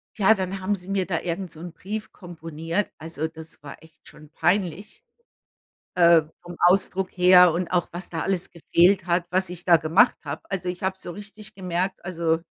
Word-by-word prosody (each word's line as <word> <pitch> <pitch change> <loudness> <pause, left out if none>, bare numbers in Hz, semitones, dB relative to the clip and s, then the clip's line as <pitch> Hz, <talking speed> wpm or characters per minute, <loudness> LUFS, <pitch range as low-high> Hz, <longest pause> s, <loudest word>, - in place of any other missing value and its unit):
tja, 210 0 +5
dann 190 0 -4
haben 190 +2 0
sie 180 -1 -11
mir 195 -1 0
da 170 -3 -2
irgend 175 0 -4
so 155 - -12
'n 175 +1 -8
Brief 210 +5 -6
komponiert. 165 +1 -5
Also, 160 0 -4
das 160 -1 -13
war 140 - -10
echt 160 -1 -20
schon 155 0 -14
peinlich, 185 +3 -1 0.9
äh, 170 -2 +6 0.2
vom 175 0 -9
Ausdruck 190 +1 +2
her 180 -1 +6
und 175 +1 -2
auch, 180 -1 0
was 175 +2 -8
da 165 -2 -4
alles 190 -2 -2
gefehlt 175 +2 +2
hat, 175 0 +1
was 185 0 0
ich 180 -1 -8
da 170 -2 +6
gemacht 165 +10 +3
habe. 145 +2 -5
Also, 185 -2 -2
ich 180 +1 -6
habe 190 0 -1
so 175 - -7
richtig 210 +2 -11
gemerkt, 185 0 -3
also 165 -3 0
180 Hz, 190 wpm, -24 LUFS, 165-190 Hz, 0.9 s, äh